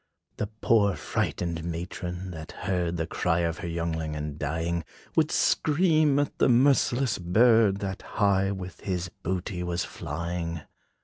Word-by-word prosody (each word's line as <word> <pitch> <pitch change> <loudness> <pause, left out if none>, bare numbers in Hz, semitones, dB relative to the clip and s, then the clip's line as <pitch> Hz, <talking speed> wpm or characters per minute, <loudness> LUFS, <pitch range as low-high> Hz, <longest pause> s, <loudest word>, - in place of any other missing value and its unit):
The 105 - -1
poor 100 -4 +4
frighted 85 -2 -2
matron, 90 +2 -5
that 80 -2 -8
heard 90 -2 -1
The 80 - -1
cry 85 +1 0
of 85 0 -1
her 95 - -4
youngling 80 -2 -2
in 75 -1 -4
dying, 80 +3 -1 0.3
Would - - +3
scream 155 -2 +3
at 145 0 0
the - - +4
merciless 125 -2 +3
bird, 105 +2 +4
That 95 -1 -3
high 100 -2 +1
with 95 -2 -6
his 90 -2 -3
booty 90 +1 -3
was 90 0 -1
flying. 85 +1 -4
90 Hz, 140 wpm, -27 LUFS, 85-105 Hz, 0.3 s, poor